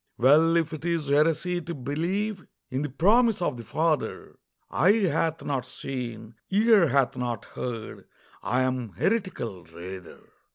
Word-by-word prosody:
Well, 155 +7 +5
if 165 -1 0
it 155 - -6
is 165 -4 -1
heresy 165 +4 +2
to 170 0 -6
believe 180 - -2 0.2
In 130 +2 -1
the 150 - -2
promise 215 - +3
of 175 -7 -1
the 115 - -8
Father, 155 +7 -1 0.4
"Eye 190 +5 +4
hath 165 -1 0
not 135 -3 -1
seen, 115 -4 -6 0.2
ear 210 -2 +5
hath 135 -1 +2
not 120 -2 -3
heard," 115 -3 -6 0.3
I 125 +2 +1
am 125 -5 -2
heretical, 120 - -2
rather. 90 +2 -10
150 Hz, 140 wpm, -26 LUFS, 125-175 Hz, 0.4 s, Well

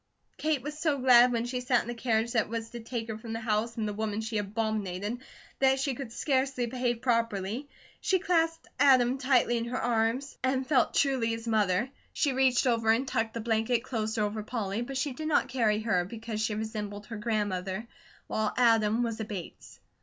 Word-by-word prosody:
Kate 305 -5 0
was 295 +1 -5
so 310 -3 +1
glad 250 -1 +6
when 235 -1 0
she 250 +1 -3
sat 250 0 +2
in - - -12
the 240 - -3
carriage 230 -1 0
that 225 -3 +1
was 225 0 -4
to 240 - -6
take 230 0 -5
her 220 -1 -5
from 225 0 -6
the 225 - -3
house 225 +1 -1
and 220 -1 -1
the 210 - -3
woman 215 0 -2
she 220 -1 -2
abominated 210 0 -2 0.4
that 265 0 +4
she 270 0 0
could 255 -2 -7
scarcely 265 -1 0
behave 240 -1 -2
properly. 230 +1 0 0.3
She 380 - +2
clasped 330 -3 +1
Adam 260 -2 +5
tightly 255 -2 +3
in 230 - -2
her 250 +2 -3
arms, 240 +3 0
and 260 0 +1
felt 260 -3 +2
truly 265 -5 +2
his 230 0 -3
mother. 215 +2 +1 0.2
She 285 -3 +1
reached 260 -1 +3
over 230 -3 +2
and 235 +4 +3
tucked 225 -1 -1
the 230 - -2
blanket 225 +1 +1
closer 220 -3 -1
over 210 +1 -2
Polly, 215 -1 -3
but 265 +2 -4
she 280 0 -1
did 310 +4 -5
not 310 - +2
carry 220 -4 +1
her, 190 -6 +1
because 220 +2 -5
she 220 -1 0
resembled 210 -1 -5
her 225 0 -7
grandmother, 205 -2 -2 0.4
while 215 -1 -1
Adam 225 -1 +4
was 230 -2 -3
a - - -1
Bates. 195 -5 -8
230 Hz, 200 wpm, -29 LUFS, 220-255 Hz, 0.4 s, glad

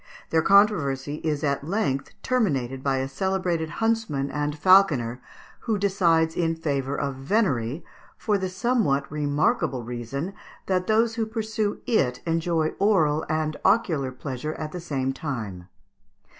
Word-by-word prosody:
Their 160 - +4
controversy 155 -9 +3
is 150 -2 -1
at 140 -1 0
length 145 -6 -2
terminated 135 - 0
by 135 0 0
a 130 0 -1
celebrated 175 +1 -1
huntsman 225 -10 -1
and 150 0 -2
falconer, 150 -9 +4 0.4
who 225 -3 -1
decides 170 -5 +2
in 165 -1 0
favour 140 -4 -2
of 140 -1 -1
venery, 140 - 0 0.3
for 205 -2 0
the 190 -1 -2
somewhat 190 - +1
remarkable 145 -3 0
reason 125 - -5 0.3
that 185 -1 0
those 225 +1 +3
who 225 -1 -1
pursue 220 -1 -2
it 135 - +1
enjoy 165 -1 +1
oral 160 -7 +3
and 155 -1 -1
ocular 175 - +2
pleasure 135 +3 -5
at 155 -1 -5
the 180 - -6
same 135 -5 -2
time. 110 - -5
155 Hz, 135 wpm, -25 LUFS, 135-195 Hz, 0.4 s, Their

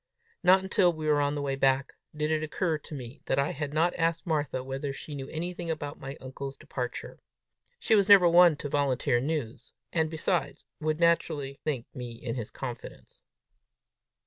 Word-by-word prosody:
Not 190 +1 +5
until 190 -2 +3
we 155 -2 -6
were 150 -1 +3
on 145 0 +1
the 145 - -2
way 135 -1 -1
back, 135 0 +2 0.2
did 150 +1 -1
it 155 -1 +1
occur 155 +1 -1
to 150 - -9
me 125 -1 -9
that - - 0
I 140 +1 +2
had 145 -1 -4
not 165 +3 +2
asked 165 +2 +1
Martha 145 -6 -1
whether 135 +2 -4
she 145 +2 -8
knew 135 -1 -6
anything 175 +1 -4
about 145 -3 -4
my 135 +1 -7
uncle's 135 +1 -7
departure. 125 -2 -5 0.6
She 225 - +1
was 200 -2 +4
never 195 -3 +9
one 170 -1 +7
to 145 - -5
volunteer 135 -4 +1
news, 140 -4 -4 0.2
and, 160 -2 +2
besides, 165 +2 -1
would 155 0 -1
naturally 155 -5 +1
think 135 -6 -2
me 125 -2 -6
in 115 0 -5
his 115 -5 -4
confidence! 120 -3 -8
150 Hz, 180 wpm, -28 LUFS, 135-165 Hz, 0.6 s, never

